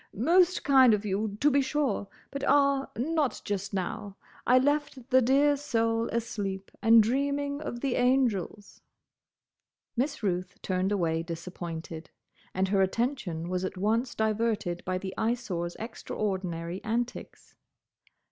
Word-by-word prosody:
"Most 350 Hz, -, +3 dB
kind 260 Hz, -5 st, +6 dB
of 210 Hz, 0 st, -6 dB
you, 205 Hz, +1 st, -2 dB
to 295 Hz, +2 st, +5 dB
be 280 Hz, +1 st, +4 dB
sure; 265 Hz, -7 st, -1 dB, 0.2 s
but—ah—not 280 Hz, 0 st, +1 dB
just 200 Hz, 0 st, -3 dB
now. 195 Hz, +1 st, -4 dB, 0.3 s
I 250 Hz, -, +6 dB
left 280 Hz, -2 st, 0 dB
the 260 Hz, 0 st, +6 dB
dear 280 Hz, +4 st, +4 dB
soul 230 Hz, -5 st, 0 dB
asleep, 200 Hz, -4 st, -3 dB
and 225 Hz, -1 st, +7 dB
dreaming 280 Hz, +4 st, -1 dB
of 240 Hz, -5 st, -5 dB
the 270 Hz, -3 st, 0 dB
angels." 245 Hz, -6 st, 0 dB, 1.1 s
Miss 265 Hz, +1 st, -1 dB
Ruth 180 Hz, -1 st, -2 dB
turned 185 Hz, +1 st, 0 dB
away 165 Hz, -5 st, +1 dB
disappointed, 165 Hz, -1 st, -7 dB, 0.4 s
and 190 Hz, +1 st, 0 dB
her 195 Hz, -1 st, +3 dB
attention 190 Hz, -, -1 dB
was 180 Hz, +1 st, -2 dB
at 185 Hz, -, -4 dB
once 225 Hz, +6 st, 0 dB
diverted 215 Hz, -5 st, -1 dB
by 185 Hz, 0 st, -1 dB
the 190 Hz, 0 st, -5 dB
Eyesore's 205 Hz, -7 st, -2 dB
extraordinary 185 Hz, -6 st, -4 dB
antics. 235 Hz, +2 st, -4 dB
225 Hz, 125 wpm, -28 LUFS, 190-265 Hz, 1.1 s, and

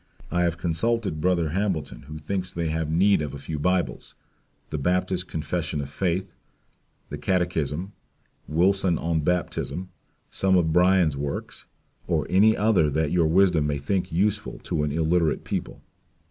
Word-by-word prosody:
I 90 Hz, +1 st, +1 dB
have 85 Hz, -1 st, +1 dB
consulted 95 Hz, +1 st, 0 dB
brother 85 Hz, -3 st, +2 dB
Hambleton, 90 Hz, -5 st, -2 dB
who 75 Hz, +1 st, -7 dB
thinks 90 Hz, +4 st, -3 dB
they 85 Hz, -2 st, -3 dB
have 80 Hz, 0 st, -1 dB
need 95 Hz, +3 st, +3 dB
of 75 Hz, -2 st, -4 dB
a -, -, -6 dB
few 75 Hz, +2 st, -5 dB
Bibles, 90 Hz, +3 st, -1 dB, 0.6 s
the 75 Hz, -, -2 dB
Baptist 90 Hz, +3 st, 0 dB
Confession 80 Hz, 0 st, -3 dB
of 70 Hz, -1 st, -5 dB
Faith, 90 Hz, +3 st, -1 dB, 0.8 s
and 75 Hz, 0 st, -6 dB
Catechism; 90 Hz, -1 st, -1 dB, 0.6 s
Wilson 90 Hz, +2 st, +2 dB
on 80 Hz, +1 st, 0 dB
Baptism, 90 Hz, +2 st, -2 dB, 0.4 s
some 95 Hz, -1 st, +3 dB
of 80 Hz, -3 st, +2 dB
Bunyan's 90 Hz, -3 st, +4 dB
works, 70 Hz, 0 st, -5 dB, 0.4 s
or -, -, +1 dB
any 105 Hz, +4 st, +5 dB
other 100 Hz, -7 st, +3 dB
that 75 Hz, +1 st, 0 dB
your 85 Hz, -3 st, +3 dB
wisdom 85 Hz, -3 st, +3 dB
may 75 Hz, -1 st, -1 dB
think 90 Hz, +6 st, -2 dB
useful 100 Hz, +5 st, 0 dB
to -, -, -1 dB
an 75 Hz, -1 st, 0 dB
illerate 80 Hz, +1 st, +1 dB
people. -, -, -4 dB
85 Hz, 150 wpm, -25 LUFS, 75-95 Hz, 0.8 s, any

